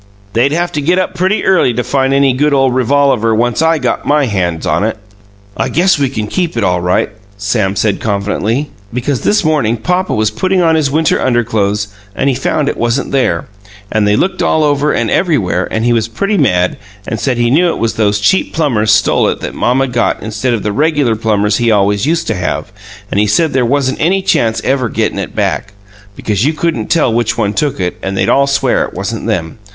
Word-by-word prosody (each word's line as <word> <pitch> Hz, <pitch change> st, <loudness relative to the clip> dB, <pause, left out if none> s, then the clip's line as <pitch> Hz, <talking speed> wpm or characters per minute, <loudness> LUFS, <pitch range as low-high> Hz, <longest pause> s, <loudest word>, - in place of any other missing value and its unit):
"They'd 120 Hz, +5 st, +2 dB
have 175 Hz, +2 st, -1 dB
to 150 Hz, -, -2 dB
get 175 Hz, +6 st, +1 dB
up 185 Hz, -, -1 dB
pretty 190 Hz, +4 st, 0 dB
early 185 Hz, -11 st, +3 dB
to 125 Hz, -, -1 dB
find 135 Hz, 0 st, 0 dB
any 135 Hz, -1 st, +3 dB
good 145 Hz, +3 st, +1 dB
ole 135 Hz, -1 st, +3 dB
revolaver, 130 Hz, -3 st, +2 dB
once 120 Hz, +4 st, 0 dB
I 160 Hz, 0 st, +3 dB
got 130 Hz, -4 st, -2 dB
MY 145 Hz, -1 st, +2 dB
hands 90 Hz, -7 st, -2 dB
on -, -, +1 dB
it!" 110 Hz, 0 st, -1 dB, 0.6 s
"I -, -, -1 dB
guess 180 Hz, -1 st, +2 dB
we 140 Hz, -2 st, +1 dB
can 110 Hz, -5 st, -3 dB
keep 170 Hz, -, -2 dB
it, 115 Hz, -, 0 dB
all 90 Hz, -2 st, +1 dB
right," 90 Hz, +4 st, 0 dB, 0.3 s
Sam 100 Hz, -1 st, -1 dB
said 100 Hz, +1 st, 0 dB
confidentially. 110 Hz, +6 st, -2 dB, 0.2 s
"Because 125 Hz, +2 st, -2 dB
this 210 Hz, -1 st, +2 dB
morning 145 Hz, -8 st, +1 dB
papa 180 Hz, +10 st, -1 dB
was 110 Hz, 0 st, +1 dB
putting 185 Hz, -, 0 dB
on 165 Hz, -2 st, +3 dB
his 155 Hz, -3 st, +1 dB
winter 155 Hz, +2 st, +1 dB
underclothes 110 Hz, -4 st, 0 dB, 0.3 s
and 140 Hz, -, +1 dB
he -, -, +1 dB
found 140 Hz, +3 st, -1 dB
it -, -, -2 dB
wasn't 120 Hz, +3 st, -1 dB
there, 135 Hz, -2 st, 0 dB, 0.5 s
and 105 Hz, -1 st, +1 dB
they 105 Hz, -, +3 dB
looked 185 Hz, -, 0 dB
all 155 Hz, -, +2 dB
over 145 Hz, 0 st, +1 dB
and 115 Hz, -2 st, -1 dB
everywhere, 105 Hz, -, +1 dB
and 110 Hz, +1 st, -2 dB
he 120 Hz, -, +3 dB
was 115 Hz, -2 st, 0 dB
pretty 200 Hz, -, -2 dB
mad, 90 Hz, -, +1 dB, 0.3 s
and 110 Hz, -, -3 dB
said 130 Hz, -3 st, -1 dB
he 120 Hz, 0 st, +1 dB
knew 170 Hz, +6 st, +4 dB
it -, -, -2 dB
was 115 Hz, -1 st, -1 dB
those 105 Hz, -2 st, +1 dB
cheap 190 Hz, -, +1 dB
plumbers 115 Hz, -10 st, +1 dB
stole 105 Hz, 0 st, +3 dB
it -, -, -1 dB
that -, -, -5 dB
mamma 130 Hz, +2 st, +1 dB
got 120 Hz, -2 st, -1 dB
instead 110 Hz, +3 st, -1 dB
of 110 Hz, -, -5 dB
the 105 Hz, -, -1 dB
regular 145 Hz, -4 st, +1 dB
plumbers 105 Hz, -1 st, 0 dB
he 120 Hz, -1 st, +1 dB
always 100 Hz, +2 st, +2 dB
used 165 Hz, +1 st, 0 dB
to -, -, -1 dB
have, 90 Hz, -3 st, -3 dB, 0.4 s
and 100 Hz, -, +1 dB
he 105 Hz, -, +2 dB
said 150 Hz, +10 st, +1 dB
there 130 Hz, -1 st, +2 dB
wasn't 135 Hz, +1 st, 0 dB
any 190 Hz, +4 st, +1 dB
chance 115 Hz, -10 st, +1 dB
ever 130 Hz, -2 st, 0 dB
gettin' -, -, -1 dB
it -, -, -6 dB
back, 100 Hz, -, -2 dB, 0.4 s
because 105 Hz, 0 st, -1 dB
you 150 Hz, +4 st, +2 dB
couldn't 155 Hz, -8 st, -2 dB
tell 150 Hz, -8 st, +2 dB
which 115 Hz, -1 st, 0 dB
one 105 Hz, -3 st, 0 dB
took 145 Hz, +3 st, -1 dB
it, 90 Hz, -1 st, -3 dB
and 95 Hz, 0 st, -3 dB
they'd -, -, +1 dB
all 140 Hz, 0 st, +3 dB
swear 140 Hz, 0 st, +1 dB
it -, -, -7 dB
wasn't -, -, -4 dB
them. 80 Hz, +3 st, -3 dB
125 Hz, 220 wpm, -13 LUFS, 105-150 Hz, 0.6 s, knew